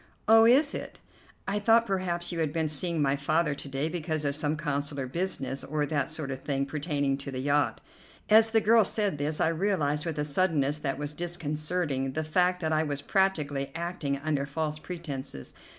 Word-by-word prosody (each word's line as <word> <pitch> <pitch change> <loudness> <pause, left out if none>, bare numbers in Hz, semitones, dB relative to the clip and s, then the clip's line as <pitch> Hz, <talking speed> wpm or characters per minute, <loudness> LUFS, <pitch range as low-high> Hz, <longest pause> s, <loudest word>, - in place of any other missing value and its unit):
"Oh, 225 +1 +7
is 280 +5 +5
it? - - -6 0.5
I 200 +2 0
thought 225 +2 +4
perhaps 185 -4 -2
you 170 - -3
had 155 -3 0
been 160 0 0
seeing 155 +1 -1
my 135 0 +2
father 150 +2 +1
to 140 - -7
day 135 +3 -1
because 160 -2 -2
of 140 0 0
some 150 0 0
consular 145 -3 -2
business, 135 -3 -3
or 150 0 -1
that 145 -2 -1
sort 155 -3 -4
of 130 - -4
thing, 140 -1 -1
pertaining 145 -2 -1
to 140 - -6
the 130 - -5
yacht." 145 +2 +1 0.5
As 220 +1 +6
the 225 0 +3
girl 225 +1 +5
said 200 -6 -1
this 150 +2 -1
I - - +3
realized, 165 -4 0
with 160 -2 -3
a 150 - 0
suddenness 150 -2 +1
that 135 -2 -2
was 145 +1 -4
disconcerting, 155 -4 -2
the 155 - -1
fact 180 +3 +1
that 160 -1 0
I 155 - +3
was 145 -2 -2
practically 150 -9 0
acting 165 -5 -2
under 140 -1 -1
false 155 +1 -3
pretences. 145 - -6
155 Hz, 195 wpm, -28 LUFS, 140-175 Hz, 0.5 s, Oh